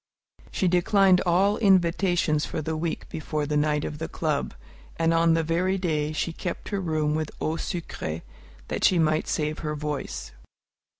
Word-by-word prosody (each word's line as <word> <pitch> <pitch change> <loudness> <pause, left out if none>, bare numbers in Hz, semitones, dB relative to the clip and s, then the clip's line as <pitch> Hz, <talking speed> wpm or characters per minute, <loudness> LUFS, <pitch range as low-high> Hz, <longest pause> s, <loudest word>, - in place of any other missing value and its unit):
She 185 - 0
declined 185 +1 +4
all 195 +4 +3
invitations 175 -5 +3
for - - -3
the 160 +1 -2
week 160 +1 -3
before 155 -1 -3
the 150 +1 -2
night 150 0 +1
of 150 - -5
the 160 - -3
club, 150 - -2 0.4
and 165 0 +2
on 165 0 +4
the 165 - +1
very 180 +4 +1
day 155 -5 -1
she 160 +2 -2
kept 175 +1 -5
her 200 -2 -2
room 155 -3 0
with 155 0 -1
eau 155 - 0
sucrée, 85 - -4 0.5
that - - -3
she 185 - +5
might 155 -1 +2
save 150 0 -1
her 150 -2 -3
voice. 150 -1 -4
160 Hz, 170 wpm, -26 LUFS, 150-175 Hz, 0.5 s, she